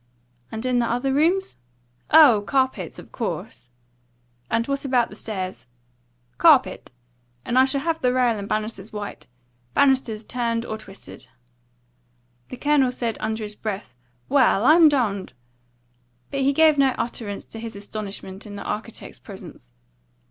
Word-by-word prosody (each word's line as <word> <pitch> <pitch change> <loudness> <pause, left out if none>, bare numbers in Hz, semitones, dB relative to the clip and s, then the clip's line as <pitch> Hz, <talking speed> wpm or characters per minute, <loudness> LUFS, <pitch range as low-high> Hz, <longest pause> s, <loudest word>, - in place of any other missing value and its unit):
"And 220 +2 -5
in 250 -1 +2
the 235 - +1
other 245 +3 0
rooms?" 350 +7 +1 0.5
"Oh, 290 -9 +7
carpets, 260 -1 0
of - - -12
course." 125 - -5 0.8
"And 230 0 +1
what 275 0 -2
about 255 -4 +2
the - - -11
stairs?" 185 - -5 0.7
"Carpet. 285 - +4 0.5
And 240 - -2
I 260 +1 +6
should 275 +1 -1
have 325 +1 -1
the 250 - +2
rail 250 -2 +2
and 200 -1 -6
banisters 215 -1 -3
white 210 -1 -7 0.5
banisters 255 -6 +2
turned 235 -2 -2
or 220 -1 -5
twisted." 200 -2 -12 1.2
The 255 - -7
Colonel 285 -2 +2
said 235 -3 -3
under 220 0 -3
his 210 0 -5
breath, 205 - -5 0.3
"Well, 255 -6 +3
I'm 320 +1 +7
dumned!" 215 - -1 1.0
but 275 - -2
he 270 +1 +3
gave 310 0 +4
no 270 -2 +3
utterance 220 -4 -4
to 225 - -10
his 225 -1 -7
astonishment 200 -1 -7
in 205 - -8
the 200 - -6
architect's 220 +1 -6
presence. - - -12
235 Hz, 145 wpm, -23 LUFS, 210-270 Hz, 1.2 s, Oh